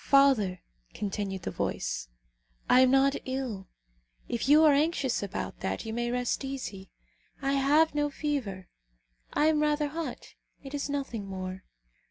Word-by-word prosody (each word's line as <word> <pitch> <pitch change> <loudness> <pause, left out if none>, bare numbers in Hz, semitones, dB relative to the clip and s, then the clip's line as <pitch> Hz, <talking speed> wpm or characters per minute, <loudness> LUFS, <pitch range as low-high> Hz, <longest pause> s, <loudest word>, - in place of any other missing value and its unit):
"Father," 260 -10 +4 0.3
continued 200 -2 -3
the - - -3
voice, - - -2 0.6
"I 250 - +6
am 260 0 +6
not 270 +1 +4
ill; 255 -7 -4 0.6
if 235 +3 -2
you 305 +2 +7
are 305 -2 +7
anxious 285 -3 +1
about 200 -2 -4
that, 190 +4 -3
you 220 - -4
may 240 +1 -1
rest 245 +2 -1
easy. 255 -8 -5 0.5
I 275 +1 0
have 285 +4 +4
no 295 0 +1
fever. 265 -11 -3 0.6
I 300 - +2
am 310 -1 +3
rather 300 -1 +1
hot; 320 +2 -6 0.3
it 275 0 -9
is 285 0 -2
nothing 265 -8 -3
more." 185 -1 -6
270 Hz, 150 wpm, -29 LUFS, 200-290 Hz, 0.6 s, you